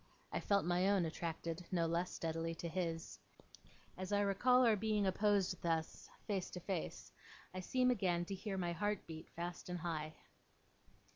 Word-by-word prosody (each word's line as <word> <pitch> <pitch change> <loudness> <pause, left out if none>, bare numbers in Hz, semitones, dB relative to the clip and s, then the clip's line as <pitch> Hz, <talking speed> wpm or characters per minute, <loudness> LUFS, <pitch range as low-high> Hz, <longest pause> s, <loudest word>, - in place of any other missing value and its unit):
I - - 0
felt 200 -3 +2
my 180 +2 +3
own 195 -4 +4
attracted, 165 +1 -3
no 170 -2 +2
less 170 +2 +1
steadily, 165 0 -2
to 170 - -4
his. 165 -1 -3 0.8
As 185 +1 -5
I 205 0 +3
recall 250 +6 +5
our 225 -2 +6
being 210 0 +1
opposed 195 -1 +2
thus, 165 -1 -1 0.2
face 195 -3 -1
to 180 - -6
face, 180 -1 -4 0.4
I 185 - -3
seem 250 +7 +3
again 180 -6 +1
to 195 - -4
hear 195 0 -3
my 175 -2 0
heart 205 +4 -1
beat 160 0 -8
fast 175 +1 -5
and 180 - -2
high. 155 -2 -3
180 Hz, 165 wpm, -38 LUFS, 165-200 Hz, 0.8 s, our